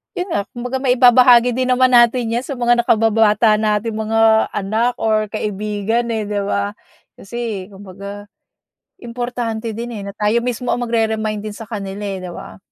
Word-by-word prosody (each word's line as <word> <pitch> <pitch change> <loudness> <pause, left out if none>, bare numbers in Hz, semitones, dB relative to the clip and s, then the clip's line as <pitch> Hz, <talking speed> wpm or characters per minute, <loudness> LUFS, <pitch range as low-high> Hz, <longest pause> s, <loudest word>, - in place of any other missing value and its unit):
yun 360 - -3
nga 200 -10 -1
kumbaga 250 +2 -4
maibabahagi 250 -1 +5
din 255 0 0
naman 255 0 +3
natin 240 -1 +4
yan 240 +2 -1
sa 275 - -5
mga 240 -1 +2
nakababata 220 -1 +3
nating 215 +1 -1
mga 220 0 +2
anak 220 +5 0
or 215 -1 +1
kaibigan, 210 +2 -2
eh, 220 -1 -1
di 205 0 -2
ba? 200 0 -1 0.4
Kasi 220 -3 -6
kumbaga 200 +1 -10 0.7
importante 235 -2 -4
din, 235 +3 -5
eh, 210 - -6
na 200 - -7
tayo 210 +3 +1
mismo 245 0 -3
ang 245 - 0
magre-remind 220 -2 -1
din 215 0 -6
sa 225 +2 -9
kanila, 200 -2 -6
eh, 195 -2 -4
'di 180 -1 -7
ba? - - -10
225 Hz, 165 wpm, -18 LUFS, 210-240 Hz, 0.7 s, maibabahagi